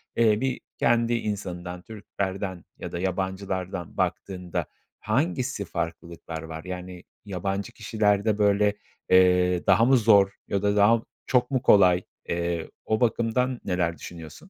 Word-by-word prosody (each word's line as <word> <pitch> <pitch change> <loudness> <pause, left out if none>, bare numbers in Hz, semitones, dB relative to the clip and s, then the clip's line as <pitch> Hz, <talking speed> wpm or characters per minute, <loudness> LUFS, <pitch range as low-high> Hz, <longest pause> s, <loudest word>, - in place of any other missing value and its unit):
eee, 110 -2 +3
bir 130 -1 -1 0.2
kendi 120 0 +2
insanından 90 -5 -4
Türklerden 95 -3 -5
ya - - -7
da 85 - -4
yabancılardan 95 -1 -3
baktığında 90 -3 -2 0.3
hangisi 130 - -1
farklılıklar 85 -1 -5
var? 80 0 -7
Yani 90 0 -7 0.2
yabancı 100 +2 -3
kişilerde 105 -1 +1
böyle, 105 0 +3 0.4
eee, 90 -1 +4
daha 115 - +5
mı 130 +1 +5
zor 100 -4 +5 0.2
ya 100 - -1
da 100 0 +1
daha 105 +3 +5
mı 115 - -11 0.2
çok 125 +1 +1
mu 130 - +1
kolay? 90 -5 +5 0.3
Eee, 85 -1 -2 0.2
o 110 0 0
bakımdan 120 +2 +1
neler 85 -3 0
düşünüyorsun? 80 -3 -9
100 Hz, 135 wpm, -26 LUFS, 90-110 Hz, 0.4 s, daha